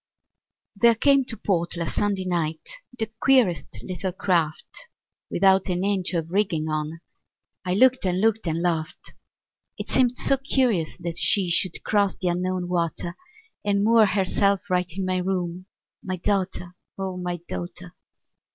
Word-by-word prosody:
There 235 +3 +5
came 275 +3 +4
to 230 - -3
port 170 -3 -1
last 170 -1 -3
Sunday 200 -2 0
night 165 -3 -2 0.3
The 220 -2 -2
queerest 220 - +2
little 185 0 -3
craft, 175 - -1 0.4
Without 190 +1 +3
an 180 0 -1
inch 195 -2 0
of 165 0 -2
rigging 180 -6 0
on; 155 +1 -3 0.6
I 180 0 0
looked 255 +4 +4
and 180 0 0
looked 225 -2 +1
and 165 +1 -1
laughed. 170 0 -2 0.6
It - - -6
seemed 250 -1 +2
so 275 - +3
curious 255 - 0
that 170 -1 -3
she 190 -4 +3
Should 175 0 +2
cross 205 -2 +1
the 180 - -1
Unknown 180 +1 -2
water, 170 0 -2 0.5
And 200 -1 +1
moor 225 0 +5
herself 200 +1 +1
right 180 -1 +1
in 190 +3 -3
my 185 0 0
room, 180 -1 -3 0.3
My 185 -1 -3
daughter, 180 -1 -2 0.2
O 190 -1 -4
my 180 -1 -3
daughter! 175 0 -7
185 Hz, 150 wpm, -24 LUFS, 175-205 Hz, 0.6 s, There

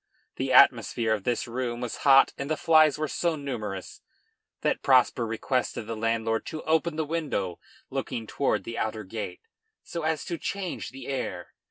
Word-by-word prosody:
The - - -1
atmosphere 115 -2 +5
of 105 -3 -3
this 120 -1 0
room 120 0 -3
was 120 -2 -4
hot 135 -1 +6
and 140 +1 -5
the 155 - 0
flies 155 -3 +5
were 155 0 -1
so 170 +3 0
numerous 110 -10 -5 0.6
that - - 0
Prosper 125 -3 +4
requested 115 +1 -1
the 115 +1 -4
landlord 115 0 0
to 155 -1 -5
open 160 +1 +1
the 160 0 -1
window 145 - -2 0.3
looking 115 - -3
toward 140 +5 0
the 115 - -5
outer 110 0 -2
gate, 110 - -6 0.4
so 170 - -5
as 155 -1 -1
to 170 -3 -4
change 195 -3 -4
the 135 +1 -10
air. 135 -2 -4
130 Hz, 170 wpm, -27 LUFS, 115-155 Hz, 0.6 s, hot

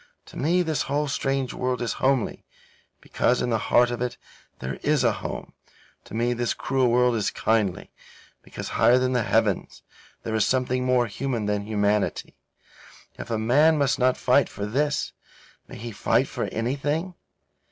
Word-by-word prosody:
To - - -15
me 175 +6 +2
this 160 -3 -1
whole 145 +2 0
strange 135 -1 -1
world 125 0 -2
is 120 - -2
homely, 130 -3 +1 0.6
because 125 - +1
in 120 - -1
the 110 - +1
heart 120 0 +4
of 120 - -4
it 125 -1 -2 0.4
there 65 +1 -5
is - - +2
a - - +4
home; - - -6 0.5
to - - -9
me 120 +2 +1
this 120 -1 -1
cruel 135 -1 +1
world 125 +1 +3
is 105 -3 0
kindly, 110 -5 -1 0.5
because - - -8
higher 125 - +4
than 130 0 +1
the 125 - +2
heavens - - 0 0.4
there 110 - -4
is 110 -1 +2
something 130 +1 0
more 125 -1 +3
human 120 0 -3
than 105 0 -2
humanity. 105 -1 0 0.8
If - - -7
a 115 - 0
man 145 +9 +4
must 140 -2 +1
not 130 0 +3
fight 130 +3 +3
for 100 - -5
this, 145 +7 -1 0.5
may - - -10
he 115 +1 -6
fight 105 - +1
for - - -3
anything? 145 +9 -2
125 Hz, 170 wpm, -25 LUFS, 115-135 Hz, 0.8 s, heart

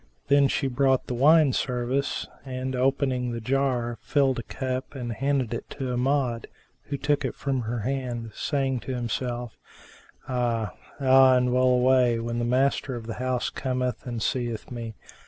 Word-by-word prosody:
Then 140 0 +6
she 135 - -1
brought 135 0 +2
the - - -4
wine 145 +2 +5
service 125 +3 -1 0.2
and 130 0 -4
opening 130 -1 +1
the 115 - -3
jar, 125 -1 0
filled 135 -3 +2
a - - -2
cup 130 +3 -4
and 120 -3 -4
handed 135 -1 0
it 115 - -5
to 130 -3 -2
Amjad, 125 -2 0 0.4
who 140 - -3
took 145 +1 0
it - - -2
from 135 -3 -1
her 115 0 -3
hand 120 -2 -3
saying 135 -3 -1
to 130 +2 -5
him 120 -1 -3
self, 120 -1 -3 0.3
' - - -26
Ah, 120 -4 -1 0.3
ah! 130 -1 +6
and 125 0 +2
well 130 0 +4
away, 125 -1 +4
when 115 +1 -3
the 120 - 0
master 130 +1 +1
of 115 -2 -7
the 115 - -4
house 130 -1 -1
cometh 125 -1 -2
and 120 -3 -3
seeth 120 -3 -2
me!" 115 -2 -6
125 Hz, 175 wpm, -26 LUFS, 120-135 Hz, 0.4 s, Then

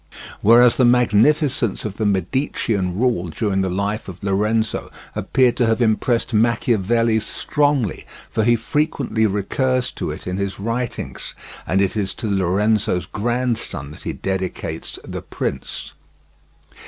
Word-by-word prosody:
Whereas 120 +3 +6
the 130 - +4
magnificence 125 - +3
of 105 -2 -5
the 110 - +1
Medicean 100 - -1
rule 115 -7 +1
during 95 +3 -1
the 95 - 0
life 100 +3 -2
of 90 0 -10
Lorenzo 105 +3 0 0.3
appeared 125 -2 +2
to 120 - +3
have 115 +1 +2
impressed 115 +1 +1
Machiavelli 115 0 +2
strongly, 140 - 0 0.2
for 110 - +1
he 120 +2 +4
frequently 115 -3 0
recurs 125 +6 0
to - - -4
it - - -7
in 90 +1 -3
his 100 -1 -3
writings, 115 +3 -4 0.3
and 95 +5 +2
it 100 +1 +1
is 100 -2 -1
to 110 - -4
Lorenzo's 100 -1 +1
grandson 115 - -2
that - - -12
he - - -4
dedicates 95 -1 -4
The - - -6
Prince. - - -4
110 Hz, 135 wpm, -21 LUFS, 95-120 Hz, 0.3 s, Whereas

